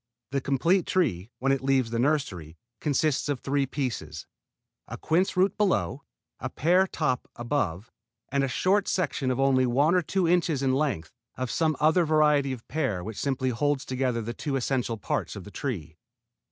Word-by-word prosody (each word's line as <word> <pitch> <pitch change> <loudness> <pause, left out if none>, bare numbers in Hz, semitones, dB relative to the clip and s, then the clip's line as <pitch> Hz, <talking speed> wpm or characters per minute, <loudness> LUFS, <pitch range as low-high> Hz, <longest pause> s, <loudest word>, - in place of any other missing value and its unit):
The 140 0 0
complete 165 +8 +2
tree, 115 - 0
when 135 +3 +1
it 135 - +1
leaves 135 -4 +2
the 115 - -1
nursery, 115 - -1 0.2
consists 150 0 0
of 140 -3 -1
three 140 +1 0
pieces, 110 - -4 0.6
a - - -6
quince 180 +4 +1
root 185 +1 +3
below, 185 -8 +1 0.4
a - - -4
pear 180 +5 +3
top 150 -8 -1
above, 115 - -2 0.4
and 140 0 +1
a - - +1
short 190 - +1
section 155 -7 0
of 130 0 -1
only 130 -2 +3
one 140 +7 +3
or 180 - +4
two 180 +2 0
inches 165 -5 +2
in 130 -1 +2
length 130 - -1 0.3
of 130 -2 -3
some 160 -2 +1
other 160 +4 +4
variety 150 -3 +3
of 125 -3 -7
pear 110 - -1
which 110 +1 -6
simply 130 -2 0
holds 140 +3 0
together 130 -3 -1
the 120 +2 -4
two 140 +2 -3
essential 125 -3 -1
parts 105 - -3
of 100 - -7
the 105 - -11
tree. 95 - -5
135 Hz, 180 wpm, -27 LUFS, 120-155 Hz, 0.6 s, or